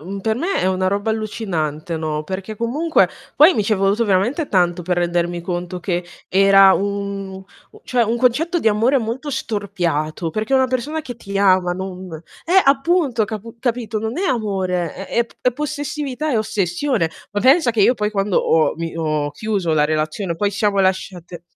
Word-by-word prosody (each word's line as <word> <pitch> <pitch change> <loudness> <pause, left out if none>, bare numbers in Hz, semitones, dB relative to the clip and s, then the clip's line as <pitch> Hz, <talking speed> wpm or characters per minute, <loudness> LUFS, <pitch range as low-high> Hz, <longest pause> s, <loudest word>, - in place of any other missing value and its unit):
mhmm, 195 +5 -6
per 220 +2 0
me 350 +9 -1
è - - 0
una 185 0 0
roba 205 +3 -1
allucinante, 170 -8 -3
no, 155 -1 -3
perché 190 +4 -6
comunque 290 +9 +2 0.3
poi 320 +5 +7
mi 215 - 0
ci 215 +2 +1
è - - -3
voluto 200 +4 +1
veramente 235 - +1
tanto 175 -2 +2
per 180 +1 -1
rendermi 175 0 -1
conto 175 0 -4
che 175 0 -2 0.2
era 195 0 +6
un 200 -1 -2
un 190 - -10 0.4
cioè, 245 -2 +1
un 225 +2 0
concetto 260 +9 +1
di 315 - -4
amore 225 +6 +2
molto 245 +4 -3
storpiato, 180 - -2
perché 215 +8 -1
una 260 -1 +4
persona 285 +6 -2
che 245 -4 -8
ti 200 -3 -6
ama 185 -2 +3
non 185 0 -6 0.4
eh, 375 +3 +5
appunto, 275 -4 +2
capu 220 +2 -7
capito, 235 -2 -2
non 220 +4 -4
è 380 +3 -1
amore, 190 - -1
è 195 - -7
è 235 - +3
p - - -22
è 250 - +3
possessività, 295 0 -3
è 240 - +2
ossessione. 215 - -1 0.2
Ma 205 - -1
pensa 265 +1 +5
che 220 -3 +2
io 240 - +5
poi 210 -4 -2
quando 200 -2 +1
ho, 160 -1 +2
mi 165 0 -5
ho 155 -2 -1
chiuso 195 -2 -1
la 150 -1 +3
relazione, 155 +4 -1
poi 200 +4 0
ci 200 - -8
siamo 205 -1 +2
lasciate 185 -2 -2
200 Hz, 190 wpm, -20 LUFS, 180-240 Hz, 0.4 s, poi